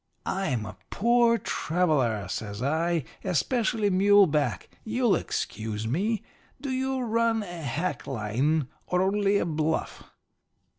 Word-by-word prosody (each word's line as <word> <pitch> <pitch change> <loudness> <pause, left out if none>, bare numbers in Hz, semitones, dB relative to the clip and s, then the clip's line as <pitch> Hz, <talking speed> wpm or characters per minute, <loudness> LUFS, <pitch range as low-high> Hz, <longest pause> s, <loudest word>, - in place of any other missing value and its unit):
"'I'm 140 - -1
a - - -9
poor 235 +1 +3
traveller,' 145 - 0
says 105 +3 -4
I. 160 +3 +1 0.2
'Especially 215 - +1
mule 200 +2 +6
back. 150 -3 -1 0.2
You'll 230 -1 +2
excuse 110 -7 -3
me. 200 - 0 0.4
Do 280 -2 -4
you 265 0 -1
run 230 -1 +1
a 175 -3 -7
hack 160 +6 -3
line 130 +6 0 0.2
or 180 +1 +2
only 200 +1 +2
a - - 0
bluff?' 160 -1 -1
180 Hz, 120 wpm, -27 LUFS, 140-220 Hz, 0.4 s, mule